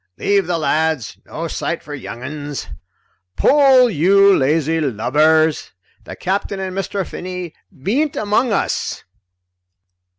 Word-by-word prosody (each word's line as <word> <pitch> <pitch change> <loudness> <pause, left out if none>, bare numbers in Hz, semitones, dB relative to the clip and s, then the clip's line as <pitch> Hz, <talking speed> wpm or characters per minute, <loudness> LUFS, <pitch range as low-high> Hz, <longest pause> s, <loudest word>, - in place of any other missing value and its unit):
"Leave 200 -3 +1
the 175 -1 0
lads 155 -6 -1
no 165 +2 -5
sight 170 +1 -3
for 150 - -9
young 125 -3 -8
uns." 145 +1 -6 0.7
"Pull, 270 -3 +5
you 195 +1 +4
lazy 155 +3 +1
lubbers! 155 +5 +1 0.3
The - - -8
Capt'n 195 +1 -2
and 190 -1 -4
Mr. 195 0 -3
Finney 180 -2 -7 0.3
bean't 275 - 0
among 215 +4 +1
us!" 200 - -2
170 Hz, 120 wpm, -18 LUFS, 150-200 Hz, 0.7 s, Pull